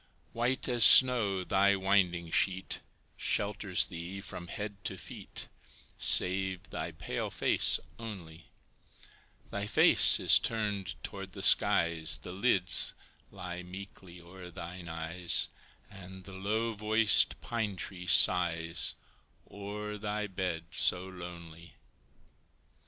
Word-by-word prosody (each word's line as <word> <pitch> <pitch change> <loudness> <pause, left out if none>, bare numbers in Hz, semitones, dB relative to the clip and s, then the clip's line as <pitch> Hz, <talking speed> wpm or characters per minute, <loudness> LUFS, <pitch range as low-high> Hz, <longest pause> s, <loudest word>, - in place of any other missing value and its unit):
White 125 +3 -2
as 120 -3 +2
snow, 110 -8 +6
thy 100 +2 +1
winding 95 -4 -1
sheet 95 +2 -1 0.4
Shelters 100 -2 0
thee 90 +2 -9
from 90 -3 -9
head 105 +2 -8
to 95 - -4
feet, - - -8 0.5
Save 95 0 +1
thy - - -6
pale - - -6
face - - +2 0.2
only; 90 -8 -11 1.0
Thy 100 0 -4
face - - +6
is - - +6
turned 105 -7 -4
toward - - -9
the - - -7
skies, 80 -2 +3
The 70 - -11
lids 95 -3 +1 0.3
lie 90 -2 -9
meekly 90 -1 -12
o'er 90 +1 -13
thine 85 +1 -10
eyes, 80 +2 +1 0.4
And 95 -1 -13
the 95 - -13
low 110 +4 -3
voiced 110 +1 +2
pine 110 -4 -5
tree 90 -1 -8
sighs 85 -3 +2 0.6
O'er 105 +1 -8
thy 105 0 -4
bed 90 -4 -5
so 90 +1 +3
lonely. 85 -2 -12
95 Hz, 115 wpm, -29 LUFS, 85-105 Hz, 1.0 s, snow